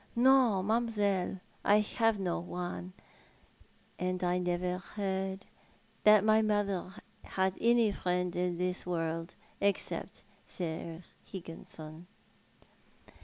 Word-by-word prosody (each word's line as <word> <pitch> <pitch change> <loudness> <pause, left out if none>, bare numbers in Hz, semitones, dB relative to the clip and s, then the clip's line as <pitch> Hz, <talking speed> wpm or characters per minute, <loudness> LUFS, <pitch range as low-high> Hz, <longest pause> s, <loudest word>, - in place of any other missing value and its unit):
" - - -31
No, 245 -5 +5
mam'selle, 205 -4 0 0.2
I 210 +1 +5
have 225 0 +1
no 180 -3 -1
one, 180 +1 -5 1.1
and 185 0 -1
I 180 0 +2
never 180 0 -1
heard 190 -1 -3 0.6
that 210 -1 +8
my 215 0 +5
mother 205 -4 0 0.3
had 190 0 0
any 235 -2 +4
friend 180 -2 -1
in 180 -1 0
this 180 +1 0
world, 165 -1 -2 0.3
except 200 -1 -1 0.2
Sir 165 0 -5 0.2
Higginson." 165 -2 -9
185 Hz, 105 wpm, -32 LUFS, 180-210 Hz, 1.1 s, that